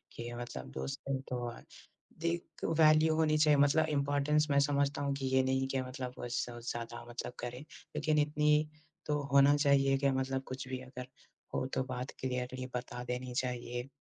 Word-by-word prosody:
कि 120 0 -5
मतलब 65 - -6
दोस्त 135 - -4
हों 135 -1 0
तो, 120 -1 -2 0.8
एक 170 -1 -3
वैल्यू 155 0 +6
होनी 155 -1 +3
चाहिए 150 -1 +5
मतलब 145 +3 +5
इम्पॉर्टेंस 145 +2 +2
मैं 140 - +5
समझता 140 0 +1
हूँ 140 -1 0
कि 135 -1 -3
ये 130 - +5
नहीं 130 0 +1
कि 135 -1 0
मतलब 130 0 -5
वोस 120 0 -2
ज़्यादा 120 0 -5
मतलब 120 +1 -5
करें। 120 +1 -5
लेकिन 155 0 -2
इतनी 150 +1 +3 0.4
तो 150 -1 0
होना 140 +1 +7
चाहिए 135 -2 +4
कि 140 0 +2
मतलब 130 0 -1
कुछ 130 0 -5
भी 130 0 -3
अगर 130 -1 -8 0.5
हो, - - 0
तो 130 - +1
बात 130 0 -5
क्लियरली 130 0 -3
बता 125 0 -4
देनी 125 0 -4
चाहिए। 125 0 -3
135 Hz, 170 wpm, -33 LUFS, 125-145 Hz, 0.8 s, होना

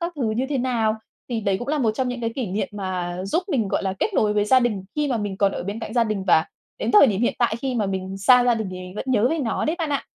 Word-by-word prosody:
các 345 +1 -3
thứ 235 -6 0
như 245 +5 -1
thế 280 -3 -1
nào? 235 -4 +1 0.3
Thì 230 -2 -2
đấy 195 -2 0
cũng 245 - -6
là 300 0 0
một 230 -5 +2
trong 255 +1 -1
những 245 -1 -4
cái 230 0 -1
kỷ 255 -5 -2
niệm 205 +8 -2
mà 180 -3 -4
giúp 330 - 0
mình, 235 - 0
gọi - - -1
là, 190 -1 -1
kết 420 - -1
nối 210 -1 +2
với 205 0 +2
gia 255 +4 +5
đình 210 -6 -1
khi 295 -1 +1
mà 245 - 0
mình 205 -3 -3
còn 200 -1 +2
ở - - -4
bên 200 +5 -5
cạnh 220 - -6
gia 235 -1 +3
đình, 210 -3 -2
và 160 - +5 0.3
đến - - -1
thời 415 -9 +8
điểm 205 -2 0
hiện 240 - +1
tại 235 -3 +2
khi 260 0 -3
mà 215 -4 0
mình 190 0 -4
xa 245 +5 +6
gia 240 -1 +4
đình 220 -4 -3
thì 185 - -6
mình 185 +1 -9
vẫn - - -4
nhớ 235 -2 +3
về 325 - 0
nó 235 -6 -1
đấy 315 +3 0
bạn 315 -3 -2
ạ. 280 - -1
225 Hz, 325 wpm, -23 LUFS, 200-255 Hz, 0.3 s, thời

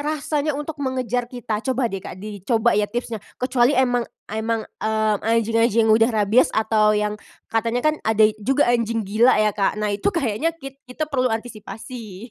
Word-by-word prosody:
rasanya 300 0 -1
untuk 295 0 -6
mengejar 250 -3 -2
kita. 240 -4 -4
Coba 260 +1 -1
deh, 195 -5 -2
Kak, 185 - -9
dicoba 215 +4 0
ya 205 0 +1
tipsnya 235 -2 -4 0.2
kecuali 255 +1 +2
emang 245 -2 +2 0.3
emang, 220 +1 -1 0.2
eee, 220 -1 +1
anjing-anjing 230 0 +2
yang 220 - +4
udah 225 +1 +5
rabies 220 +1 +3
atau 215 -1 +3
yang 210 0 0 0.4
katanya 230 +2 0
kan - - -3
ada 220 -1 +4 0.2
juga 270 +7 +2
anjing 230 -2 0
gila 220 +6 +4
ya, 215 0 +3
Kak, 200 -1 0
nah 210 0 -1
itu 200 - -3
kayaknya 290 - 0
kit 275 -3 -10
kita 250 +5 -3
perlu 255 -3 +1
antisipasi, 225 -1 -7
230 Hz, 170 wpm, -22 LUFS, 215-255 Hz, 0.4 s, udah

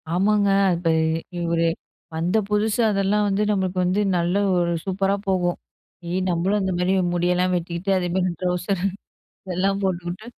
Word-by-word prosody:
ஆமாங்க. 200 +3 +2 0.3
அப்ப 170 0 -1 0.6
ஒரு 165 0 +2 0.5
வந்த 175 +6 0
புதுசு 210 +2 +1
அதெல்லாம் 200 +1 +1
வந்து 200 +1 0
நம்மளுக்கு 190 -2 -1
வந்து, 185 +3 +1 0.2
நல்ல 175 +1 0 0.2
ஒரு 170 -1 +1
சூப்பரா 195 +1 0
போகும். 180 -2 +1 0.5
ஏ - - -2 0.2
நம்மளும் 180 +4 +1
அந்த 190 -1 -1
மாரி 180 +1 +1 0.2
முடியெல்லாம் 180 +1 +1
வெட்டிக்கிட்டு, 175 +2 -2
அதே 180 -1 -1
மாரி 185 -1 +1
ட்ரௌசர் 180 +1 -1 0.8
எல்லாம் 195 +2 +1
போட்டுக்கிட்டு 180 +2 -3
185 Hz, 140 wpm, -23 LUFS, 175-195 Hz, 0.8 s, ஆமாங்க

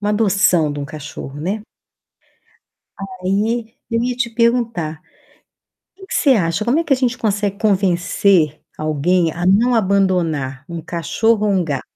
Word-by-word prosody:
uma 205 0 -1
adoção 200 -7 +2
de 145 - -6
um 145 - -3
cachorro, 145 -1 -8
né. 195 +7 -3 1.6
Aí, 220 +5 -1 0.2
eu 230 0 0
ia 245 0 -1
te 245 -1 -1
perguntar, 230 -9 0 1.0
que 385 0 -13
que - - -5
você 285 - +3
acha, 185 -3 +1
como 245 +7 +2
é 335 - 0
que 300 - 0
a - - +5
gente 255 -1 -1
consegue 205 -2 -1
convencer 185 -5 +2 0.2
alguém 155 +3 +1
a 175 +2 -4
não 230 +6 +4
abandonar 180 - 0
um 170 -1 -5
cachorro 210 +7 0
ou 205 - +2
um 185 -2 +1
gato? 145 -5 -3
195 Hz, 155 wpm, -18 LUFS, 165-225 Hz, 1.6 s, a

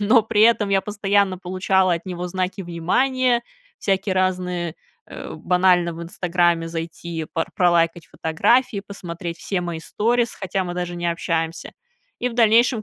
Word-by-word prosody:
Но 220 +3 +5
при 215 -1 +2
этом 225 -2 +4
я 195 -1 +3
постоянно 200 -2 +1
получала 185 0 +1
от 170 +3 -7
него 180 -1 -4
знаки 185 +2 -3
внимания, 240 +9 +1 0.4
всякие 195 -1 0
разные, 180 -3 -1 0.3
э, - - -8
банально 180 -1 +2
в 165 - -7
"Инстаграме" 170 -1 0
зайти, 165 0 -5
пор 165 - -1
пролайкать 170 -2 +2
фотографии, 205 +7 +1
посмотреть 175 -3 -6
все 190 +1 -2
мои 170 -2 -4
сторис, 235 +6 0
хотя 190 -1 -2
мы 175 -1 -5
даже 175 -1 -3
не 175 0 -2
общаемся. 165 -1 -2 0.5
И 250 - 0
в 240 - -8
дальнейшем, 230 0 +4
185 Hz, 150 wpm, -22 LUFS, 170-205 Hz, 0.5 s, Но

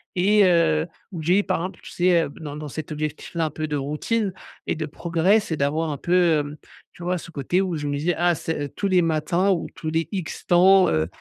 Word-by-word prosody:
et 200 +3 +4
heu, 165 -3 +3 0.3
ou 170 - -5
j'ai, 180 +5 +4
par 185 - 0
exemple, 185 +3 -5
tu - - -10
sais, 175 -2 +3
dans 150 -3 -6
dans 150 0 -6
cet 155 +3 -7
objectif-là, 155 +2 -3
un 155 - -1
peu 155 +1 -4
de 150 - -2
routine 150 +10 -1 0.4
et - - 0
de 155 - -3
progrès, 170 +6 +2
c'est 170 -7 -4
d'avoir 155 +3 0
un 145 - -3
peu, 175 -1 +3
hem, 145 +1 -5 0.4
tu 175 - -11
vois, 180 +1 0
ce 165 - -10
côté 160 +5 0
où 185 -3 -1
je 145 -2 -3
me 145 - -1
disais: 165 +4 0
«Ah, 175 +1 +3
c'est, 160 -1 -3
heu, 145 - -3
tous 200 - -3
les 185 -2 +4
matins, 165 +4 +1
ou 175 -4 -1
tous 155 - -4
les 160 +1 0
X 185 -5 -5
temps, 185 +2 +6
heu 80 0 +1
165 Hz, 235 wpm, -23 LUFS, 155-180 Hz, 0.4 s, temps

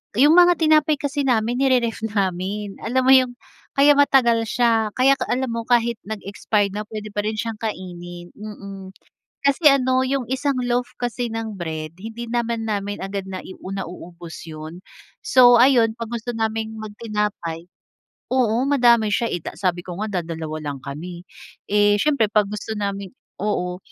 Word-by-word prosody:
yung 285 +7 +6
mga 355 0 +7
tinapay 310 -1 +3
kasi 285 0 -2
namin 240 0 +1
ni-re-ref 250 -4 +2
namin. 195 0 -2
Alam 255 +3 0
mo 260 - +5
yung 255 -2 +5 0.4
kaya 280 +1 +6
matagal 235 -5 +4
siya. 225 -3 +1
Kaya 270 +1 +4
ka - - -2
alam 255 0 -1
mo 230 0 -4
kahit 235 -2 +2
nag-expired 205 -1 -1
na, 210 +1 -5
puwede 215 -2 -7
pa 205 - -3
rin 215 - -2
siyang 220 0 -4
kainin, 175 -4 -6
mm. 200 -2 -9 0.5
Kasi 285 +2 +5
ano, 260 -1 +2
yung 265 -1 -1
isang 265 +1 -1
loaf 245 0 0
kasi 245 -1 -2
ng 225 -2 -4
bread, 160 -2 -5
hindi 225 +5 -7
naman 235 -1 -1
namin 205 -1 -2
agad 195 0 -4
nai 185 0 -7
u 185 - -9
nauubos 175 -3 -8
yun. 160 +2 -9 0.4
So 245 -1 +7
ayun, 235 -3 +5
kapag 235 0 -4
gusto 240 +2 -5
naming 220 0 -2
mag 215 -1 -7
tinapay 205 -6 -3 0.6
oo, 245 -2 +2
madami 240 -6 +4
siya, 235 - +1
eh 175 - -3
da - - -7
sabi 180 -2 0
ko 180 0 -7
nga 205 -4 -1
dadalawa 160 -2 -5
lang 145 -2 -4
kami. 170 +6 -7 0.5
Eh, 205 0 +4
siyempre 280 -4 +2
'pag 210 -1 +3
gusto 210 +1 -5
namin 200 -2 -3 0.3
oo. 180 -4 -1
220 Hz, 165 wpm, -22 LUFS, 195-245 Hz, 0.6 s, mga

